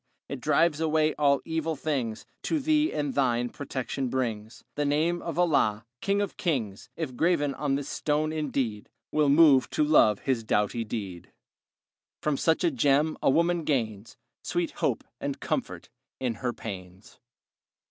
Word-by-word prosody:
It - - -5
drives 165 -2 +2
away 155 -1 +2
all 140 -2 +2
evil 160 0 -2
things; 135 -7 -3 0.2
To 320 - 0
thee 305 +2 +2
and 145 -2 -2
thine 120 -3 +1
protection 130 -1 -4
brings. 115 -4 -3
The 150 - -1
name 155 +4 +1
of 170 - -5
Allah, 115 -11 +2 0.2
king 200 +1 +1
of 205 - -3
kings, 115 - -2
If 155 -6 -4
graven 155 -2 +2
on 140 -1 -1
this 140 0 -3
stone, 155 +1 0
indeed, 130 -9 -2 0.2
Will 150 -2 +3
move 145 -3 +6
to - - +1
love 110 -9 +5
and 120 -5 0
doughty 105 +3 +1
deed. 100 -6 -6 0.9
From 150 -1 0
such 160 +5 +1
a 170 - +3
gem 145 +4 +2
a - - +3
woman 170 +4 +2
gains 115 -8 -2 0.3
Sweet - - -1
hope - - -1 0.2
and - - -4
comfort - - -3 0.3
in 125 -3 -1
her 125 - 0
pains. 95 -3 -9
140 Hz, 155 wpm, -27 LUFS, 120-160 Hz, 0.9 s, move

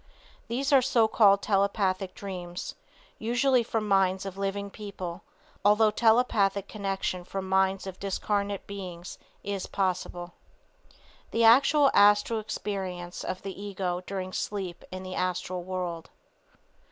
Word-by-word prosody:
These 270 +5 -1
are 270 - +7
so 240 -3 +3
called 200 -3 +5
telepathic 195 -2 +1
dreams, 180 -3 -6 0.5
usually 245 +3 +2
from 225 -2 -2
minds 190 -1 +2
of 195 -1 -5
living 200 0 -3
people, 190 -4 -7 0.4
although 210 +1 +5
telepathic 210 -3 +3
connection 195 -3 -3
from 190 +1 -5
minds 190 0 +2
of 190 -1 -7
disincarnate 200 0 -2
beings 180 -3 -8 0.2
is 200 -1 -3
possible. 180 -2 -2 1.0
THE 230 - +1
ACTUAL 275 +5 +6
ASTRAL 205 +2 +5
EXPERIENCE 185 -4 -5
OF 185 - -4
THE 195 0 -6
EGO 180 -3 -2
DURING 185 -1 -4
SLEEP 190 -4 -4
IN 185 0 -6
THE 185 0 -6
ASTRAL 180 0 -2
WORLD. 175 -2 -4
195 Hz, 125 wpm, -28 LUFS, 185-210 Hz, 1.0 s, are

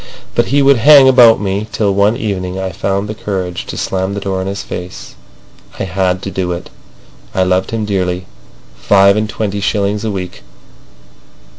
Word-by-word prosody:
But - - +1
he 140 +2 +2
would 140 -1 +5
hang 140 +3 +7
about 125 -4 +6
me, 100 +1 -2
till 105 -2 0
one 100 +3 +2
evening 95 -3 -3
I 95 0 -3
found 100 +3 -2
the 110 - -4
courage 95 -5 -4
to - - -6
slam 95 +1 -2
the - - -3
door 95 -1 -3
in 95 - -4
his 100 +1 -4
face. 90 +1 -8 0.7
I - - -2
had 95 0 -1
to 100 - -5
do 90 -1 -2
it. 85 - -8 0.6
I 95 - +2
loved 90 0 0
him 115 -2 -3
dearly. 90 -3 -2 0.5
Five 100 0 +4
and 105 0 -1
twenty 105 -2 -3
shillings 100 +1 -1
a 110 - -1
week! 90 -3 -6
100 Hz, 180 wpm, -15 LUFS, 95-105 Hz, 0.7 s, hang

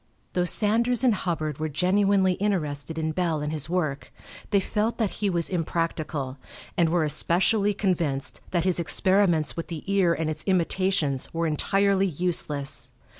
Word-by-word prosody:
Though 180 -1 +1
Sanders 230 +6 +2
and 250 -3 +5
Hubbard 155 -7 -2
were 155 0 -2
genuinely 190 +4 +2
interested 160 -6 -2
in 160 0 -1
Bell 165 -2 0
and 150 0 -2
his 155 -1 -3
work, 155 -6 -2 0.4
they 200 - +3
felt 215 +4 -1
that 220 -5 0
he 205 - +2
was 170 -3 +1
impractical, 160 -6 -2 0.4
and 170 -2 +3
were 170 0 +2
especially 195 +7 +2
convinced 165 -9 -1
that 175 -2 0
his 185 -1 +1
experiments 175 -2 +2
with 165 - -5
the 165 -3 -6
ear 195 -4 +2
and 160 - -2
its 155 0 -3
imitations 185 -6 0
were 165 0 0
entirely 195 +5 +2
useless. 155 -4 -2
175 Hz, 155 wpm, -26 LUFS, 155-195 Hz, 0.4 s, and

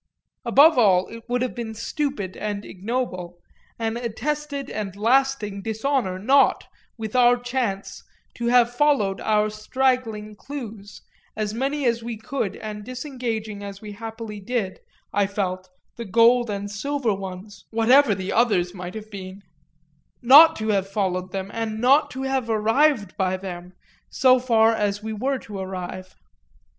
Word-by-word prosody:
Above 280 +5 +6
all 190 -5 +4
it 230 0 -9
would 245 0 +1
have 255 - -2
been 225 -2 -6
stupid 265 - -3
and 205 -1 -4
ignoble, 185 -4 -4 0.4
an 225 0 -2
attested 280 +5 -3
and 200 -3 -5
lasting 225 -2 +1
dishonour, 220 -2 -1
not, 265 +9 +3 0.3
with 220 0 -6
our 245 -1 +5
chance, 245 -5 -3 0.3
to 235 - -3
have 240 0 +4
followed 245 -9 +2
our 215 -1 +2
straggling 215 -1 -1
clues, 220 -6 -9 0.3
as 215 -1 -2
many 275 +4 -1
as 235 -1 +1
we 230 -1 -5
could 220 -3 -3
and 210 -1 -7
disengaging 235 -5 -5
as 200 -1 -7
we 210 0 -9
happily 225 0 -7
did, 200 -2 -3 0.3
I 200 0 +2
felt, 185 -2 -3 0.3
the 235 - -5
gold 235 +3 +4
and 200 -1 -3
the 205 - -9
silver 270 +1 -1
ones, 195 +1 -8
whatever 230 +1 +4
the 190 0 -4
others 195 -7 +2
might 180 0 -7
have 215 0 -8
been 195 0 -9 0.8
not 290 +7 +8
to 220 0 -3
have 195 -2 +1
followed 185 -2 -2
them 195 +1 -4
and 225 -1 -3
not 270 +6 +4
to 265 +1 -6
have 265 -3 -1
arrived 225 - +2
by 185 -1 0
them, 180 -1 -8 0.4
so 255 -1 +4
far 230 -2 +4
as 205 -1 -1
we 220 0 -4
were 265 +6 -1
to 210 -5 -8
arrive. 185 0 -6
220 Hz, 150 wpm, -23 LUFS, 200-250 Hz, 0.8 s, not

